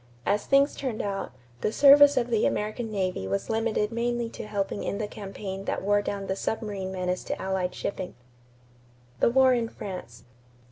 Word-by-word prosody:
As 205 +1 0
things 275 +1 +4
turned 255 -6 -3
out, 195 -6 -3 0.3
the 210 - 0
service 285 +2 +7
of 240 -1 +1
the 220 -2 +3
American 215 +2 -2
navy 185 - -2
was 100 - -2
limited 220 -1 0
mainly 235 0 -1
to 210 - -8
helping 200 -1 -2
in 200 - -2
the 215 - -2
campaign 195 -1 -7
that - - -2
wore 205 +1 +3
down 200 -1 -4
the 190 - -2
submarine 200 -3 -3
menace 185 -1 -2
to - - -3
Allied 190 -1 -2
shipping. 185 -2 -4 1.0
=The - - +4
War 260 +1 +5
in 235 -2 0
France. 180 - -8
210 Hz, 175 wpm, -27 LUFS, 190-235 Hz, 1.0 s, service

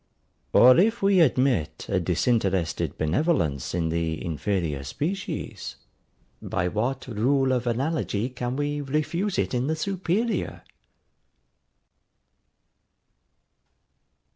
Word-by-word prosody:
Or 125 +5 +7
if 220 +3 +2
we 195 -1 +4
admit 130 - +2
a 95 - +1
disinterested 95 0 0
benevolence 80 - 0
in 85 -2 0
the 80 -1 -1
inferior 80 -3 -2
species, 170 - -4 0.7
by 90 - -1
what 120 +7 -2
rule 130 +4 +1
of 125 -1 0
analogy 120 -3 -1
can 125 0 -4
we 145 +1 -1
refuse 155 +8 -1
it - - 0
in 125 +2 0
the 160 - 0
superior? 195 +6 -2
125 Hz, 95 wpm, -25 LUFS, -, 0.7 s, Or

